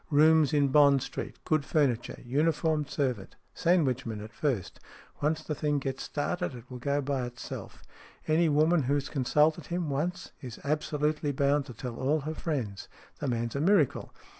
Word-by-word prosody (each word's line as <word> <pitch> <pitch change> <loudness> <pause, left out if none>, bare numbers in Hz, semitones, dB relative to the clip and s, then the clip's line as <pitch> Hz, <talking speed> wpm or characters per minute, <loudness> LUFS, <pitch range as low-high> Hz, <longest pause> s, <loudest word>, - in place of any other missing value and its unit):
" - - -34
Rooms 155 -1 +5
in 145 -2 +3
Bond 140 -1 +5
Street. - - -6
Good 155 -2 +2
furniture. 140 -6 0
Uniformed 150 +2 +1
servant. 125 -9 -2 0.2
Sandwichmen 135 - +1
at 110 - -11
first. 130 - -2 0.4
Once 155 +2 0
the 155 - -3
thing 150 0 0
gets 135 -1 -3
started, 175 +1 -2
it 120 - -10
will 125 - -6
go 140 +3 0
by 135 -3 -1
itself. 120 0 -8 0.4
Any 160 +1 +3
woman 155 +3 +4
who 140 +2 +1
has 140 -1 -2
consulted 150 +3 +2
him 170 -3 -2
once 170 +6 -2
is 125 -3 -8
absolutely 150 0 0
bound 140 +1 +1
to 125 - -9
tell 120 +1 -6
all 145 +4 +1
her 155 +3 -4
friends. 125 - -3 0.3
The 145 - -2
man's 115 -1 -2
a 140 - 0
miracle. 175 -5 +2
145 Hz, 170 wpm, -29 LUFS, 130-155 Hz, 0.4 s, Rooms